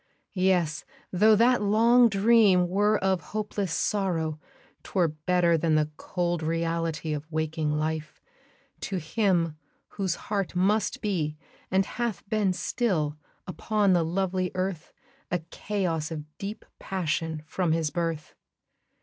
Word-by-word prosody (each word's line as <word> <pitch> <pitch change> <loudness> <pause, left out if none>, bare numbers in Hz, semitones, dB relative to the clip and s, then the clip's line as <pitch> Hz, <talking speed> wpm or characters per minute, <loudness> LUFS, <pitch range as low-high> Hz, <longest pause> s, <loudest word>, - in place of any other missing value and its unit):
Yes! 180 -5 +1 0.3
tho' 215 +4 +5
that 240 +3 +4
long 230 +4 +5
dream 200 -3 +4
were 205 +4 +2
of 190 -2 +2
hopeless 205 -3 -3
sorrow, 165 -4 -1 0.4
'Twere 180 -4 +1
better 170 +2 +1
than 160 0 +2
the 155 0 +1
cold 175 0 -2
reality 165 -1 -1
Of 150 +2 -6
waking 155 0 -1
life, 155 0 -3 0.6
to 190 - -3
him 170 -2 0 0.3
whose 190 -4 -2
heart 200 -3 -3
must 200 +3 +1
be, 160 -7 -1 0.3
And 190 +1 +2
hath 235 -2 -4
been 210 -2 +1
still, 180 -7 -1 0.3
upon 200 +1 +1
the 175 - +4
lovely 185 +2 -1
earth, 185 -3 -3 0.4
A 180 - +1
chaos 175 -7 -2
of 155 -2 -5
deep 205 +2 -6
passion, 160 -4 -2
from 175 +1 -1
his 160 -2 0
birth. 165 -3 -3
180 Hz, 125 wpm, -27 LUFS, 160-200 Hz, 0.6 s, tho